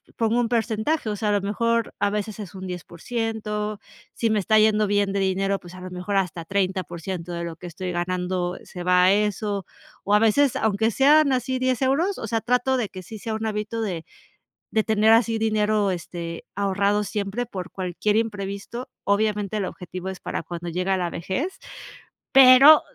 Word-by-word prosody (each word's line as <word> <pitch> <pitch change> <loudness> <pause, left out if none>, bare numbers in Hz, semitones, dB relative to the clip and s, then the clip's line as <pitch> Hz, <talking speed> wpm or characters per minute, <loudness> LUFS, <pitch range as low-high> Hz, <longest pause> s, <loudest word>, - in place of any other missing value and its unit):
pongo 230 +1 +1
un 240 - +1
porcentaje, 230 +4 0
o 210 - -1
sea, 210 +1 -1
a - - +3
lo 205 - +2
mejor 230 +3 0
a 205 0 +2
veces 210 +1 -3
es 200 -2 -8
un 190 0 -7
10%, 210 +4 -4 0.4
si 230 - 0
me 215 - +2
está 215 +3 +3
yendo 215 -1 +3
bien 205 -1 +1
de 200 - 0
dinero, 195 +1 0
pues 175 +1 -12
a 185 - -10
lo 185 0 -8
mejor 180 +3 -4
hasta 180 -3 -1
30% 185 -2 -3
de 170 0 -3
lo 165 -1 -6
que 180 - -9
estoy 180 +2 -5
ganando 180 0 -2
se 180 - -8
va 180 0 +4
a 185 - +6
eso, 205 -1 -1 0.4
o 200 - +1
a - - +6
veces 245 +5 +3
aunque 220 -3 +1
sean 280 +5 +5
así 260 0 -1
10 255 -1 0
euros, 320 +10 +1
o - - -5
sea, 225 +1 -1
trato 250 +2 +1
de 230 -5 -1
que 185 - -9
sí 220 +3 -9
sea 220 +2 -3
un 220 0 -3
hábito 215 +1 -3
de 175 -6 -4 0.7
de 220 -1 +2
tener 220 0 +3
así 225 0 +3
dinero, 215 -2 +1
este, 170 -2 -5
ahorrado 200 +1 +1
siempre 205 +3 -3
por 190 -6 -7
cualquier 190 +2 -1
imprevisto, 210 +2 -3
obviamente 210 0 0
el 205 - -1
objetivo 185 0 -6
es 190 - -8
para - - -4
cuando 170 +1 -6
llega 185 +3 0
la 175 -2 -1
vejez, 225 - -3 0.7
pero 270 +3 +9
205 Hz, 190 wpm, -24 LUFS, 185-225 Hz, 0.7 s, pero